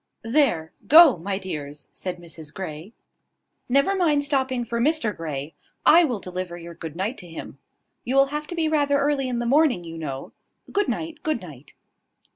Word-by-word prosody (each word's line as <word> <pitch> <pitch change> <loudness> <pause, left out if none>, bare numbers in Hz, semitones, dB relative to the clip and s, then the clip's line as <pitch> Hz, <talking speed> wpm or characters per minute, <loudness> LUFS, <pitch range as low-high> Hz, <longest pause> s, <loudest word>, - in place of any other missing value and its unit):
"There, 225 - +2 0.2
go, 315 -3 +9
my 190 +3 -3
dears," 150 -7 -6
said 180 -1 -5
Mrs 160 -3 -10
Grey. 165 +1 -7 0.8
"Never 275 +9 +3
mind 310 -6 +2
stopping 265 -4 0
for 235 0 -2
Mr 275 - +1
Grey. 150 -2 -5 0.3
I 340 +2 +7
will 245 -8 -2
deliver 180 -2 -5
your 170 0 -9
good 165 -2 -8
night 200 +8 -3
to 180 - -10
him. 165 - -9 0.4
You 255 - -2
will 275 0 +6
have 300 0 -3
to 345 - -6
be 325 -2 +1
rather 290 -2 +2
early 280 -2 +1
in 245 - -1
the 240 - -2
morning, 270 - +3
you 165 -1 -8
know. 135 -4 -5 0.4
Good 410 0 +1
night, 320 -2 -4
good 310 -5 -1
night." 145 -5 -12
235 Hz, 180 wpm, -24 LUFS, -, 0.8 s, go